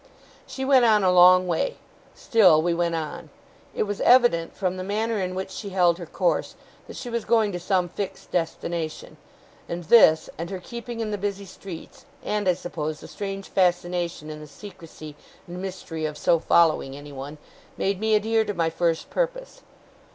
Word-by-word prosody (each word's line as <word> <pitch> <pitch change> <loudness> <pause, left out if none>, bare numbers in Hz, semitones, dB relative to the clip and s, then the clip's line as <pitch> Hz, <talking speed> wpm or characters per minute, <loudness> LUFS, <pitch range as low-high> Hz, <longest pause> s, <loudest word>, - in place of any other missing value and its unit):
She 265 - -5
went 265 -2 +5
on 215 -3 +4
a 185 - +4
long 180 0 +7
way. 180 - -1 0.4
Still 195 -10 +4
we 170 +2 +1
went 170 0 0
on. 155 -2 -5 0.5
It - - +1
was 205 -1 -4
evident, 240 -10 +4
from 185 -1 -1
the 185 - -4
manner 215 +2 -1
in 185 0 -3
which 190 0 -4
she 200 +1 -6
held 175 -2 +2
her 170 - -7
course, - - -1 0.3
that - - -10
she - - -7
was 235 -2 -2
going 220 -2 +2
to 180 - -4
some 180 0 0
fixed 195 +2 -6
destination; 165 -1 -3 0.5
and 175 +1 -4
this, 160 -4 +6
and 170 +1 -4
her 190 - -5
keeping 235 +3 -7
in 215 -1 -3
the 205 - -3
busy 200 0 -3
streets, 185 -2 -11 0.2
and 210 -2 0
I 180 - +3
suppose 155 -3 -5
the - - -11
strange 195 -1 -6
fascination 175 -3 0
in 155 - -8
the 150 - -10
secrecy 155 -3 -11 0.3
and 175 +1 -8
mystery 180 -4 -5
of 150 -1 -7
so 165 +2 +2
following 155 -5 +2
anyone, 145 0 -9 0.4
made 195 -1 -1
me 220 0 +2
adhere 220 +1 +2
to 205 - -4
my 165 -1 0
first 165 -1 -1
purpose. - - -3
185 Hz, 180 wpm, -24 LUFS, 165-210 Hz, 0.5 s, long